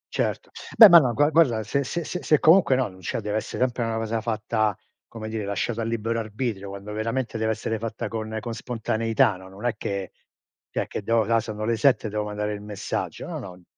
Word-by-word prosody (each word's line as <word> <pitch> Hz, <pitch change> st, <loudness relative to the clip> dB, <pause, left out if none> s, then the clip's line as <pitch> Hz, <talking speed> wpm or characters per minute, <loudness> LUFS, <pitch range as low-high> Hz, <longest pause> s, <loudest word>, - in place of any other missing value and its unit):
Certo. -, -, -2 dB, 0.3 s
Beh, 220 Hz, -3 st, +12 dB
ma 170 Hz, -1 st, +10 dB
no 125 Hz, -5 st, +1 dB
gua 145 Hz, +6 st, +3 dB
guarda 130 Hz, -9 st, +3 dB
se 140 Hz, +6 st, -1 dB
se 170 Hz, +5 st, -3 dB
se 180 Hz, -, -5 dB
se 155 Hz, -, +4 dB
comunque 160 Hz, -4 st, +5 dB
no, 130 Hz, -2 st, +1 dB
no 95 Hz, -1 st, -14 dB
cioè, 95 Hz, -, -3 dB
deve 105 Hz, 0 st, -2 dB
essere 110 Hz, -, -2 dB
sempre 125 Hz, -1 st, -1 dB
una 115 Hz, -1 st, -1 dB
cosa 115 Hz, 0 st, -2 dB
fatta, 110 Hz, -2 st, -1 dB, 0.3 s
come 110 Hz, -1 st, -8 dB
dire, 110 Hz, -1 st, -3 dB
lasciato 110 Hz, +3 st, -2 dB
a -, -, -1 dB
libero 115 Hz, 0 st, -1 dB
arbitrio 110 Hz, -2 st, -4 dB
quando 100 Hz, +1 st, -8 dB
veramente 115 Hz, +2 st, -2 dB
deve 110 Hz, 0 st, 0 dB
essere 110 Hz, 0 st, -3 dB
fatta 115 Hz, 0 st, -4 dB
con 110 Hz, -1 st, -4 dB
con 115 Hz, +2 st, -5 dB
spontaneità 115 Hz, -3 st, 0 dB
no; 95 Hz, 0 st, -13 dB
non 100 Hz, +5 st, -10 dB
è 120 Hz, -, +2 dB
che 100 Hz, -2 st, -4 dB, 0.6 s
cioè -, -, -2 dB
che -, -, -5 dB
devo 115 Hz, +2 st, +2 dB
"Ah, 115 Hz, +2 st, +2 dB
sono 110 Hz, -1 st, -5 dB
le 115 Hz, 0 st, +1 dB
7 120 Hz, -2 st, +3 dB
devo 105 Hz, 0 st, -2 dB
mandare 105 Hz, 0 st, -3 dB
il 100 Hz, -, -6 dB
messaggio", 105 Hz, -1 st, -4 dB
no, -, -, -5 dB
no. 90 Hz, -1 st, -10 dB
110 Hz, 220 wpm, -25 LUFS, 105-120 Hz, 0.6 s, Beh